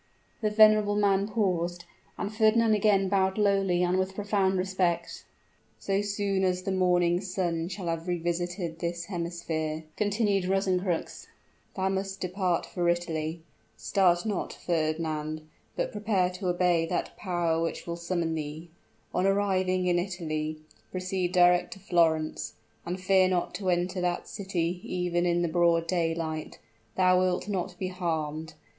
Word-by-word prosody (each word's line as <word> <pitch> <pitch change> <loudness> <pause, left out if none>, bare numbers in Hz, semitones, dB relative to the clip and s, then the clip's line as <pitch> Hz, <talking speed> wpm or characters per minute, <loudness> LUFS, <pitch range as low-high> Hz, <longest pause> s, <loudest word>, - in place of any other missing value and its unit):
The 215 - +2
venerable 215 -1 +5
man 200 -1 +2
paused, 175 -5 -1 0.3
and 205 +1 -3
Fernand 220 0 +4
again 205 -2 +3
bowed 190 0 +1
lowly 195 -4 +2
and 180 +1 +2
with 190 0 -2
profound 200 -2 +1
respect. 185 -2 -1 0.5
"So 195 0 0
soon 200 -1 -1
as 185 -1 +1
the 195 - -2
morning's 180 0 +2
sun 170 -3 -1
shall 185 0 -6
have 165 0 -3
revisited 175 0 -2
this 170 0 -3
hemisphere," 170 -3 -3
continued 205 -2 +1
Rosencrux, 185 -2 -1 0.5
"thou 190 0 0
must 195 0 -3
depart 180 -1 -1
for 175 -2 -1
Italy. 165 -2 -2 0.4
Start 180 -3 +2
not, 205 -4 -2
Fernand 155 -2 -2 0.3
but - - -1
prepare 205 -4 +1
to 180 +1 -5
obey 175 -2 +2
that 175 - -2
power 170 -4 0
which 165 - -3
will 170 - -3
sustain 170 -1 -2
thee. 155 +2 -5 0.4
On 185 - +2
arriving 185 -2 +1
in 175 -1 +3
Italy, 155 -4 -3 0.3
proceed 185 -1 -2
direct 180 -1 +4
to - - -14
Florence; 165 -4 +1 0.3
and 180 +2 -3
fear 185 0 +4
not 180 -1 0
to 185 +1 -2
enter 180 +1 0
that 175 -1 -1
city 180 -3 -2
even 175 -1 -1
in 175 0 +2
the - - +1
broad 170 0 +3
daylight. 165 -2 -2 0.4
Thou 185 -1 +5
wilt 185 +1 0
not 185 -3 -3
be 185 0 -3
harmed! 160 -3 -3
180 Hz, 145 wpm, -28 LUFS, 170-195 Hz, 0.5 s, venerable